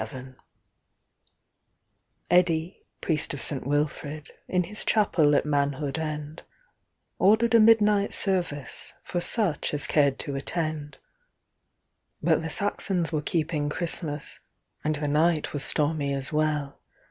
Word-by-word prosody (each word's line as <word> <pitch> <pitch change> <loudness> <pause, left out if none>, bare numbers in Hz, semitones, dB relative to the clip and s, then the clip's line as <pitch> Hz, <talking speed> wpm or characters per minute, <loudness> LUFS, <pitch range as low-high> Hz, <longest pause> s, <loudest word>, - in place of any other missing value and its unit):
687)EDDI, 175 -1 +2 0.2
priest 155 -3 -1
of - - -7
St. 135 -3 0
WilfridIn 150 +4 -2
his 210 +4 -7
chapel 165 -9 +3
at - - +2
Manhood 145 0 -1
End, 155 0 -5 0.8
Ordered 220 +4 +4
a 230 - +7
midnight 210 -2 +5
serviceFor 175 - -2
such 175 -8 +1
as 145 - 0
cared 140 -3 +2
to 140 - -5
attend. 155 +1 -4 1.2
But - - +2
the 160 - -4
Saxons 185 -2 0
were 155 -2 -1
keeping 150 -1 -1
Christmas, 155 -2 -3 0.4
And 155 0 0
the 150 0 -3
night 155 +2 +1
was 145 -1 -1
stormy 145 -2 0
as 135 +2 -2
well. 150 -2 -1
155 Hz, 110 wpm, -26 LUFS, 145-175 Hz, 1.2 s, a